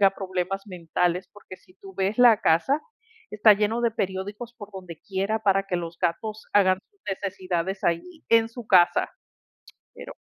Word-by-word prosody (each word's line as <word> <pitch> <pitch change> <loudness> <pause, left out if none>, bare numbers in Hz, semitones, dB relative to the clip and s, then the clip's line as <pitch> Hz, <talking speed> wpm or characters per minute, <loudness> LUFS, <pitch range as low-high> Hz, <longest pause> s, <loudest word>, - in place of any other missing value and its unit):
tenga 195 -1 +6
problemas 190 0 -4
mentales, 180 0 -2
porque 200 -2 -12
si 185 0 -25
tú 195 0 -14
ves 195 +4 -1
la 240 -3 +7
casa, 265 - +2 0.5
está 210 +1 +6
lleno 215 +3 0
de 235 - +2
periódicos 205 +4 -4
por 205 -3 -11
donde 180 -4 -9
quiera 195 +3 -2
para 195 -2 +2
que 180 - -1
los 170 -1 -6
gatos 210 +5 -2
hagan 185 -2 +4
sus 405 -2 -39
necesidades 190 -1 -3
allí 305 - -2
en 225 0 +4
su 235 -1 -10
casa, 180 -4 +4 0.9
pero - - -9
195 Hz, 165 wpm, -25 LUFS, 185-215 Hz, 0.9 s, la